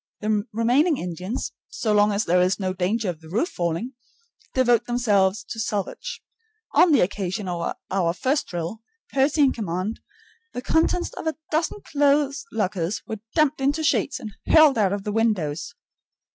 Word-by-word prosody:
The 210 Hz, -1 st, 0 dB
remaining 250 Hz, +8 st, +3 dB
Indians, 180 Hz, +5 st, -4 dB, 0.2 s
so 215 Hz, -2 st, -1 dB
long 210 Hz, 0 st, +4 dB
as 205 Hz, +1 st, 0 dB
there 180 Hz, +2 st, +3 dB
is 180 Hz, +1 st, +2 dB
no 185 Hz, -1 st, -1 dB
danger 195 Hz, +4 st, -1 dB
of 170 Hz, -3 st, -4 dB
the 160 Hz, -, -13 dB
roof 230 Hz, -, 0 dB
falling, 175 Hz, +9 st, -2 dB, 0.6 s
devote 245 Hz, -3 st, +3 dB
themselves 205 Hz, -5 st, +2 dB
to 225 Hz, -, -5 dB
salvage. 220 Hz, -, -3 dB, 0.5 s
On 355 Hz, -, +6 dB
the 290 Hz, -, +5 dB
occasion 190 Hz, +1 st, -2 dB
of 175 Hz, -1 st, -2 dB, 0.2 s
our 180 Hz, -3 st, +1 dB
first 270 Hz, -, 0 dB
drill, 175 Hz, +5 st, -5 dB, 0.3 s
Percy 280 Hz, +3 st, +3 dB
in 270 Hz, -, +5 dB
command, 195 Hz, 0 st, -3 dB, 0.5 s
the 245 Hz, -, -4 dB
contents 325 Hz, +4 st, +1 dB
of -, -, -6 dB
a 315 Hz, -, -1 dB
dozen 330 Hz, +6 st, -1 dB
clothes 280 Hz, -1 st, +2 dB
lockers 195 Hz, -3 st, -1 dB
were 220 Hz, -, -5 dB, 0.2 s
dumped 305 Hz, -3 st, +2 dB
into 285 Hz, +4 st, +1 dB
sheets 295 Hz, -, +1 dB
and 220 Hz, -5 st, -7 dB, 0.2 s
hurled 310 Hz, -6 st, +6 dB
out 195 Hz, -3 st, +3 dB
of 200 Hz, -1 st, -2 dB
the 210 Hz, -, -3 dB
windows. 205 Hz, -9 st, -1 dB
215 Hz, 165 wpm, -24 LUFS, 185-275 Hz, 0.6 s, On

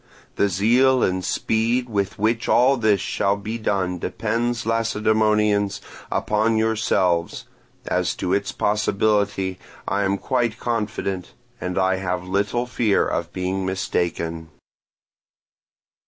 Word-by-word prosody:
The 100 Hz, -, +2 dB
zeal 120 Hz, +8 st, +3 dB
and 95 Hz, 0 st, 0 dB
speed 115 Hz, +5 st, 0 dB
with 100 Hz, -4 st, -2 dB
which 115 Hz, +3 st, 0 dB
all 130 Hz, +3 st, +5 dB
this 110 Hz, -5 st, +2 dB
shall 100 Hz, +1 st, 0 dB
be 110 Hz, +3 st, -5 dB
done 95 Hz, -4 st, -1 dB
depends, 115 Hz, +5 st, -2 dB
Lacedaemonians, 105 Hz, -2 st, +1 dB, 0.3 s
upon 110 Hz, +1 st, +1 dB
yourselves; 100 Hz, -6 st, +1 dB, 0.4 s
as -, -, 0 dB
to 90 Hz, -, -2 dB
its 100 Hz, 0 st, 0 dB
possibility, 105 Hz, -2 st, 0 dB, 0.3 s
I 100 Hz, +2 st, 0 dB
am 100 Hz, 0 st, +1 dB
quite 120 Hz, 0 st, -1 dB
confident, 105 Hz, -5 st, -3 dB, 0.3 s
and 90 Hz, +1 st, -4 dB
I 95 Hz, 0 st, +2 dB
have 90 Hz, -1 st, -3 dB
little 100 Hz, +5 st, 0 dB
fear 120 Hz, -4 st, +1 dB
of -, -, -2 dB
being 95 Hz, +1 st, -2 dB
mistaken. 85 Hz, -3 st, -2 dB
105 Hz, 115 wpm, -22 LUFS, 95-115 Hz, 0.4 s, all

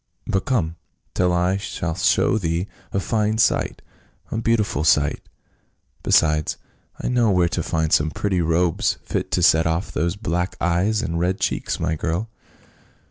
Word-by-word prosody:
But 95 Hz, -, -1 dB
come, 85 Hz, -11 st, 0 dB, 0.4 s
till 90 Hz, -1 st, +2 dB
I 90 Hz, +2 st, +1 dB
shall 85 Hz, -4 st, -4 dB
show 95 Hz, +5 st, +2 dB
thee 85 Hz, -1 st, -1 dB, 0.3 s
a 95 Hz, -, 0 dB
fine 110 Hz, +1 st, 0 dB
sight 110 Hz, -, +1 dB, 0.2 s
— -, -, -35 dB
a -, -, -2 dB
beautiful 110 Hz, -10 st, +1 dB
sight. 75 Hz, -2 st, +2 dB, 0.8 s
Besides, 75 Hz, -1 st, +2 dB, 0.4 s
I -, -, -3 dB
know 120 Hz, -3 st, +2 dB
where 90 Hz, -3 st, +3 dB
to -, -, -2 dB
find 80 Hz, -1 st, -1 dB
some 75 Hz, +1 st, +3 dB
pretty 95 Hz, +2 st, -1 dB
robes, 85 Hz, +1 st, +1 dB
fit -, -, -3 dB
to 90 Hz, -, 0 dB
set 80 Hz, -1 st, +5 dB
off 80 Hz, +3 st, -1 dB
those 85 Hz, +3 st, -1 dB
black 90 Hz, -3 st, -2 dB
eyes 90 Hz, +5 st, +1 dB
and 85 Hz, -1 st, -2 dB
red 90 Hz, +2 st, 0 dB
cheeks, -, -, -1 dB
my 80 Hz, 0 st, 0 dB
girl." 85 Hz, +7 st, -2 dB
90 Hz, 160 wpm, -22 LUFS, 80-100 Hz, 0.8 s, set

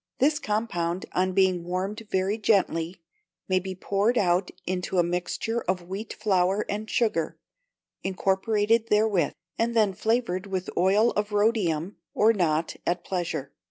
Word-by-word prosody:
This 295 Hz, +3 st, +3 dB
compound, 190 Hz, -, -1 dB
on 185 Hz, +1 st, +1 dB
being 185 Hz, -2 st, +3 dB
warmed 190 Hz, +5 st, -3 dB
very 190 Hz, +3 st, 0 dB
gently, 185 Hz, -5 st, +1 dB, 0.5 s
may 185 Hz, -1 st, +3 dB
be 190 Hz, +1 st, -6 dB
poured 205 Hz, +6 st, +1 dB
out 180 Hz, -1 st, +2 dB, 0.2 s
into 185 Hz, +1 st, -2 dB
a 175 Hz, -, +5 dB
mixture 180 Hz, +7 st, -2 dB
of 180 Hz, -1 st, -1 dB
wheat 200 Hz, +4 st, -5 dB
flour 195 Hz, -1 st, +1 dB
and 210 Hz, +2 st, -4 dB
sugar, 190 Hz, -9 st, 0 dB, 0.6 s
incorporated 205 Hz, +4 st, +1 dB
therewith, 210 Hz, -6 st, +2 dB, 0.3 s
and 235 Hz, +1 st, +1 dB
then 210 Hz, -4 st, +3 dB
flavoured 215 Hz, -2 st, 0 dB
with 190 Hz, -2 st, -3 dB
oil 200 Hz, +6 st, +4 dB
of 210 Hz, 0 st, -2 dB
rhodium, 205 Hz, -5 st, +1 dB, 0.2 s
or 220 Hz, +2 st, +5 dB
not, 165 Hz, -5 st, 0 dB
at 175 Hz, +1 st, -1 dB
pleasure. 170 Hz, -7 st, -3 dB
190 Hz, 140 wpm, -26 LUFS, 180-215 Hz, 0.6 s, a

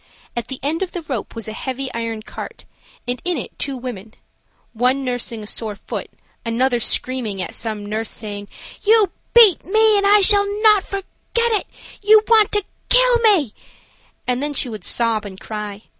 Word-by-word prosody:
At 240 Hz, -, -4 dB
the 265 Hz, -, -6 dB
end 310 Hz, +5 st, -1 dB
of 380 Hz, -, -3 dB
the 350 Hz, -, -5 dB
rope 260 Hz, -9 st, -5 dB
was 225 Hz, -2 st, -5 dB
a 215 Hz, -, -5 dB
heavy 260 Hz, +2 st, -5 dB
iron 230 Hz, -1 st, -4 dB
cart, -, -, -9 dB, 0.4 s
and 245 Hz, -1 st, -2 dB
in 355 Hz, -2 st, -1 dB
it 245 Hz, -, -6 dB
two 275 Hz, -2 st, -3 dB
women–one 245 Hz, +3 st, -5 dB
nursing 240 Hz, -3 st, -3 dB
a -, -, -8 dB
sore 215 Hz, 0 st, -4 dB
foot, -, -, -6 dB, 0.3 s
another 240 Hz, +2 st, 0 dB
screaming 235 Hz, -4 st, -2 dB
at 185 Hz, -, -4 dB
some 215 Hz, -2 st, -4 dB
nurse, 215 Hz, +1 st, -3 dB
saying: 205 Hz, -2 st, -6 dB, 0.4 s
"You 425 Hz, -3 st, +4 dB, 0.2 s
beat 445 Hz, -7 st, +7 dB
me 435 Hz, +2 st, +3 dB
and 400 Hz, -, +1 dB
I 410 Hz, 0 st, +6 dB
shall 405 Hz, 0 st, +7 dB
not 425 Hz, -2 st, +6 dB
forget 395 Hz, -1 st, -5 dB, 0.5 s
it. 425 Hz, -, 0 dB, 0.3 s
You 425 Hz, +1 st, +6 dB
want 440 Hz, -3 st, +5 dB
to 415 Hz, -1 st, +4 dB, 0.3 s
kill -, -, +6 dB
me," 385 Hz, -, +3 dB, 0.7 s
and 250 Hz, +1 st, -1 dB
then 290 Hz, 0 st, -3 dB
she 255 Hz, -, -1 dB
would 215 Hz, -2 st, -8 dB
sob 230 Hz, -2 st, +1 dB
and 195 Hz, -2 st, -9 dB
cry. 210 Hz, -1 st, -7 dB
255 Hz, 175 wpm, -20 LUFS, -, 0.7 s, beat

